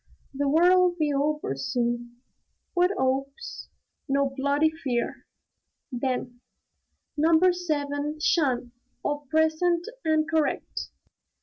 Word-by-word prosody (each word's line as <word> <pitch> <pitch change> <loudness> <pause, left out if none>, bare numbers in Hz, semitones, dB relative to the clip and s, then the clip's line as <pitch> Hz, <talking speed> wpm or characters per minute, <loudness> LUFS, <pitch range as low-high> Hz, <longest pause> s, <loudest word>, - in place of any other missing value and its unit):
"The 280 +1 0
War 335 +5 +5
'll 365 -1 +4
be 300 -3 +1
over 290 - 0
soon." 240 - -2 0.5
"What 360 0 +3
'opes?" 270 - -2 0.4
"No 275 0 +2
bloody 285 +3 +2
fear!" 260 -7 -3 0.6
Then, 245 -1 -3 0.7
"Number 325 +4 +4
Seven, 295 -3 -2
'shun! 260 -7 +1 0.3
All 290 -1 -2
present 320 +3 +2 0.2
and 315 -1 +2
correct." 315 -3 -1
290 Hz, 100 wpm, -26 LUFS, 265-320 Hz, 0.7 s, War